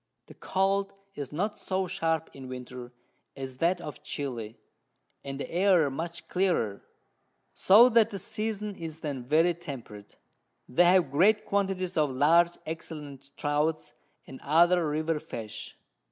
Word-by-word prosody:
The - - -14
Cold 195 +1 0 0.2
is 145 -7 -6
not 200 +8 -2
so 190 0 -1
sharp 165 -2 -1
in 135 -1 -10
Winter 125 -1 -8 0.5
as 130 -1 -7
that 175 +5 +1
of 150 -3 -8
Chili, 120 -6 -5 0.7
and 135 0 -6
the - - -4
Air 175 -5 +3
much 165 +5 -6
clearer, 175 - 0 0.7
so 215 +6 +7
that 230 -2 +4
the 200 - -5
Season 210 +1 -4
is 160 -2 -8
then 140 -5 -4
very 160 +7 +3
temperate: 135 -11 -9 0.5
they 175 +8 +4
have 175 -5 +4
great 200 +9 +4
Quantities 190 -3 -1
of 150 -2 +3
large 165 +6 +3
excellent 150 -4 -7
Trouts, 150 +2 -1 0.3
and 135 - -11
other 170 +2 +4
River 155 +1 -1
Fish. 115 -9 -7
160 Hz, 140 wpm, -28 LUFS, 140-185 Hz, 0.7 s, so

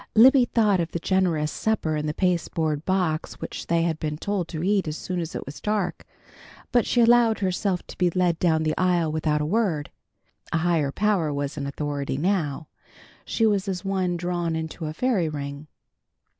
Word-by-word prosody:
Libby 255 +3 +7
thought 210 -5 +2
of 165 -1 -2
the 170 - -1
generous 170 -5 +1
supper 205 -8 -1
in 150 0 -2
the 150 - -1
pasteboard 160 -4 0
box 180 -4 0
which - - -6
they 170 0 +2
had 165 -2 -1
been 150 -1 -3
told 195 0 -2
to 160 -1 -5
eat 195 -2 +1
as 155 0 -3
soon 180 -1 -3
as 165 -1 -4
it - - -4
was 140 +2 -9
dark, 205 -5 -2 0.6
but 240 -2 +3
she 240 - +3
allowed 235 -1 +5
herself 185 -1 -1
to - - -11
be 180 -1 +3
led 175 -1 +1
down 160 -3 +2
the 155 0 0
aisle 175 -3 +2
without 155 -1 0
a - - 0
word. 175 -5 0 0.6
A 170 - +2
higher 160 -4 +1
power 195 -4 +1
was 140 0 -3
in 140 -2 -4
authority 140 -1 -3
now. 155 -3 -1 0.6
She 225 - +1
was 205 -2 +1
as 185 -1 -3
one 185 -2 0
drawn 175 -1 -2
into 160 0 -4
a 155 - -4
fairy 210 -10 +1
ring. 140 0 -6
170 Hz, 190 wpm, -25 LUFS, 155-195 Hz, 0.6 s, Libby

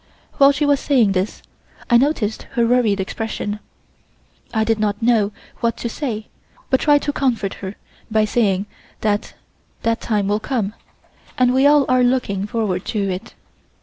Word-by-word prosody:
While 275 0 +8
she 285 +1 0
was 285 -1 +3
saying 250 -9 +3
this 190 +2 -2 0.4
I 240 - +4
noticed 240 -5 +1
her 235 -3 +2
worried 230 -4 +2
expression. 210 +1 -3 0.9
I 220 -1 +1
did 220 0 +1
not 205 -1 0
know 225 -3 +2 0.3
what 235 -1 0
to 235 - -3
say, 230 -5 -4 0.5
but 260 - +4
tried 290 -1 +3
to 290 - -1
comfort 235 -9 0
her 195 +1 -5 0.3
by 215 -1 +2
saying 205 -3 +1 0.4
that 210 -1 -1 0.5
that 230 +1 0
time 210 -3 0
will 205 +1 +1
come, 215 -3 -2 0.6
and 250 -1 +3
we 265 +2 +5
are 290 -1 +6
all 255 -1 +2
looking 245 -6 +1
forward 205 -5 -1
to 200 -3 -1
it. 190 +6 -6
225 Hz, 160 wpm, -20 LUFS, 205-255 Hz, 0.9 s, While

